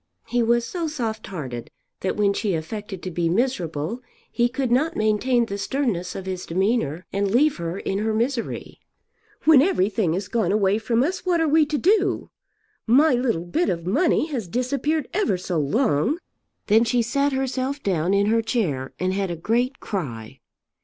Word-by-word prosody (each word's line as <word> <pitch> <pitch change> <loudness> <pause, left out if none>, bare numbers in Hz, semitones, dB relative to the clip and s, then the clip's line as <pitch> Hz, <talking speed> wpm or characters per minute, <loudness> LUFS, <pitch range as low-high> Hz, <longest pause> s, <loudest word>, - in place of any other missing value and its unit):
He 245 0 0
was 235 +1 +2
so 340 +2 -3
soft 230 -8 -4
hearted 130 -11 -6 0.3
that 190 - -1
when 205 -1 +2
she 200 -3 -1
affected 190 +3 -6
to 185 - -4
be 170 0 0
miserable, 180 - -1 0.3
he 240 0 +2
could 255 0 -2
not 305 +7 +2
maintain 225 +3 +2
the 200 -2 -5
sternness 195 -5 -1
of 190 - -6
his 185 -1 -5
demeanour 185 - 0
and 200 0 0
leave 280 +8 +3
her 170 +1 -4
in 195 0 -2
her 220 +1 0
misery. 235 +2 -2 0.7
"When 305 -4 +8
everything 210 - +1
has 190 +3 -3
gone 220 -6 0
away 205 0 +2
from 230 +2 +1
us, 365 +6 -2
what 355 -2 +1
are 325 - +2
we 305 0 +4
to 300 0 -1
do? 390 +3 +1 0.6
My 280 +7 +5
little 235 -9 0
bit 330 - 0
of 170 -1 -2
money 300 - +2
has 235 -9 -3
disappeared 270 - -1
ever 375 - +1
so 180 -2 -2
long." 155 - +1 0.5
Then 220 +2 +5
she 235 +1 +1
sat 280 +5 +1
herself 265 +1 -2
down 180 -2 0
in 200 0 +3
her 225 +2 +3
chair 165 - -2
and 185 +1 -1
had 195 -1 -1
a 170 - -2
great 240 - 0
cry. 125 - -5
220 Hz, 180 wpm, -23 LUFS, 185-265 Hz, 0.7 s, When